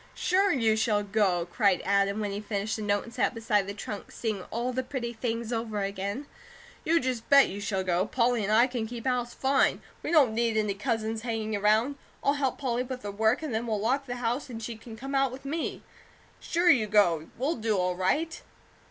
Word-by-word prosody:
"Sure 385 +2 +2
you 225 -7 +2
shall 215 -1 +1
go!" 195 -4 +1
cried 195 +1 +2
Adam, 200 +1 +2
when 205 -1 -2
he 200 +1 -4
finished 210 0 -2
the 220 - -5
note, 205 -1 +1
and 235 - -12
sat 240 - 0
beside 210 -3 +1
the 200 - -4
trunk 205 0 -7
seeing 215 -4 -3
all 240 +3 -2
the 260 - 0
pretty 250 -2 -4
things 230 0 -3
over 220 -3 -2
again. 200 +7 -3 0.6
"You 330 +1 +3
just 250 -4 -3
bet 280 -1 +7
you 200 +2 -6
shall 195 -2 -1
go. 185 +1 +1
Polly 240 -1 +1
and 205 - -1
I 230 +3 +6
can 245 -3 -3
keep 235 +1 -7
house, 245 -2 -1
fine! 270 +1 +2 0.2
We - - -4
don't 285 -9 +5
need 230 -1 +1
any 210 -2 +1
cousins 220 +1 -2
hanging 225 -2 -2
around. 215 +7 +2 0.3
I'll 280 - +3
help 275 -3 -1
Polly 250 -3 -1
with 255 0 -5
her 205 - -4
work, 220 +7 +1
and 295 -6 -3
then 225 +2 -1
we'll 215 -2 0
lock 265 +6 0
the 245 - -3
house 245 +3 -2
and 230 -2 -6
she 230 +1 -4
can 225 0 -11
come 270 +4 -6
out 270 -2 +2
with 265 +2 -10
me. 310 +4 -3 0.6
Sure 350 +1 +3
you 225 -7 +3
go! 175 -7 +3
We'll 275 +6 -1
do 220 -2 0
all 180 -1 0
right." 300 - 0
225 Hz, 220 wpm, -28 LUFS, 205-255 Hz, 0.6 s, bet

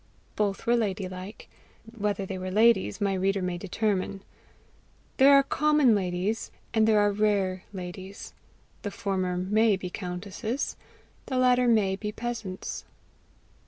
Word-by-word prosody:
Both 205 -2 -1
were 235 - +4
lady 205 -4 -1
like; 185 +3 -9 0.5
whether 205 -2 -1
they 190 -1 -5
were 185 0 -4
ladies, 215 -1 +3
my 200 -2 +1
reader 195 +1 0
may 180 -1 -2
determine. 195 0 -2 0.9
There 270 +2 +7
are 275 - +6
common 300 -3 +3
ladies 190 +2 -1 0.2
and 220 -1 +3
there 215 -1 +5
are 205 0 +3
rare 200 -3 0
ladies; 190 +1 -8 0.5
the 205 - -3
former 190 -3 -2
MAY 210 +3 +3
be 180 -1 -6
countesses; 200 +7 -4 0.5
the 260 - -2
latter 250 -1 +4
MAY 205 -5 +3
be 210 0 -4
peasants. 225 -5 -5
200 Hz, 135 wpm, -27 LUFS, 185-225 Hz, 0.9 s, There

